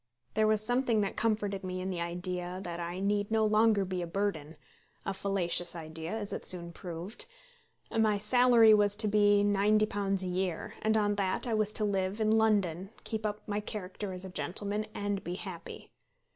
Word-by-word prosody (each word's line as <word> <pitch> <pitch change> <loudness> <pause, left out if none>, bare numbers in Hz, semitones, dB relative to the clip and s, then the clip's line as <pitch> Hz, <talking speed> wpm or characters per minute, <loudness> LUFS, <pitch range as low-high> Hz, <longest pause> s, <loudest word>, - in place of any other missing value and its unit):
There 215 0 +3
was 215 -1 +2
something 245 -2 +2
that 200 - -2
comforted 210 -3 0
me 185 0 -4
in 185 +1 -3
the 175 -2 -3
idea 180 +1 -2
that 175 -1 -5
I 175 +1 -4
need 205 +1 0
no 220 -1 +2
longer 215 -1 +4
be 185 -1 -3
a 175 - -3
burden, 165 -5 -2 0.5
a 195 - -1
fallacious 185 -3 +1
idea, 160 0 -6
as 215 -2 -3
it - - -4
soon 170 -2 -1
proved. 180 - -4 0.6
My 220 -2 +2
salary 240 0 +6
was 205 -1 +4
to 215 0 +1
be 205 -1 +4
£90 205 -1 +2
a - - -3
year, 180 -1 -2
and 220 0 +2
on 205 -1 +2
that 190 +3 0
I 235 - -1
was 215 -1 +1
to 215 - +1
live 195 0 -1
in 215 -1 +2
London, 200 -5 +2
keep 220 -1 -2
up 210 0 -6
my 205 0 -1
character 205 -1 -5
as 185 0 -5
a - - -6
gentleman, 205 +4 -2
and 205 -1 -2
be 175 - -4
happy. 185 -3 -8
200 Hz, 185 wpm, -31 LUFS, 185-215 Hz, 0.6 s, salary